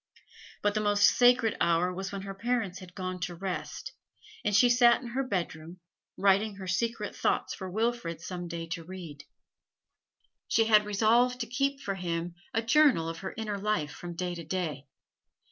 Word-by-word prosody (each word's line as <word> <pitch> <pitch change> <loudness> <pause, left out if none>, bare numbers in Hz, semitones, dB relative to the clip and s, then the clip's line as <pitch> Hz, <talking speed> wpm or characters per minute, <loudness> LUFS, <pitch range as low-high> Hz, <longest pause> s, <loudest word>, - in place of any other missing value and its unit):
But 205 0 +2
the 215 - 0
most 205 -1 +2
sacred 245 -2 +5
hour 170 +2 +2
was 190 +1 -5
when 195 -1 -5
her 195 0 -6
parents 205 -2 -2
had 180 -2 -13
gone 185 -1 -4
to 175 0 -4
rest, 185 +1 -5 0.5
and 210 -3 +1
she 245 +4 +6
sat 240 0 +5
in 245 - -8
her 255 +3 -1
bedroom, 175 -7 -4 0.4
writing 200 +2 +3
her 195 -1 -8
secret 210 +3 -2
thoughts - - 0
for 190 -1 -6
Wilfrid 220 -5 -1
some 175 0 -6
day 170 0 -5
to 165 0 -4
read. 165 -4 -9 1.2
She 225 - +3
had 210 -1 +5
resolved 235 +4 +3
to - - -1
keep 275 +3 -1
for 195 - -2
him 170 -2 -3 0.2
a 225 - 0
journal 235 - +4
of 165 0 -5
her 190 - -6
inner 210 -2 -3
life 195 -8 -1
from 175 +2 -8
day 180 +1 -2
to 170 -1 -7
day. 155 -4 -3
195 Hz, 180 wpm, -29 LUFS, 175-225 Hz, 1.2 s, she